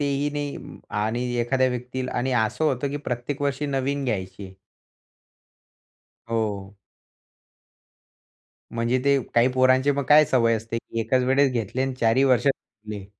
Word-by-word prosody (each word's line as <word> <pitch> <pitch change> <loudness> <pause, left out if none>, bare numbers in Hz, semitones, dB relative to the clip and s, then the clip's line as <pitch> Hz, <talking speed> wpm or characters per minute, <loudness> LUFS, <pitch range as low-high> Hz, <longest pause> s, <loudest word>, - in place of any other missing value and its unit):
तेही 140 0 0
नाही 145 -1 -4
अं - - -11 0.3
आणि 120 +3 -2 0.2
एखाद्या 130 +2 +2
व्यक्तीला 125 +1 -4
आणि 130 +1 -1
असं 110 +8 -1
होतं 140 -2 0
की 145 - -3
प्रत्येक 125 +4 -4
वर्षी 140 +1 -1
नवीन 140 0 -1
घ्यायची 100 -5 -3
आहे. 95 - -12 1.8
हो. 105 -3 -2 2.0
म्हणजे 115 +2 0
ते 140 0 +4 0.2
काही 120 +2 +5
पोरांचे 130 +2 +4
मग 140 - -1
काय 150 +1 +7
सवय 120 -5 +2
असते, 115 +1 -4
की 115 0 -5
एकाच 130 +3 +1
वेळेस 135 +1 +3
घेतले 120 +2 -2
आणि 135 -1 -2
चारही 115 +4 +3
वर्ष 130 0 +3
घातले. 105 -6 -4
130 Hz, 145 wpm, -24 LUFS, 115-140 Hz, 2.0 s, काय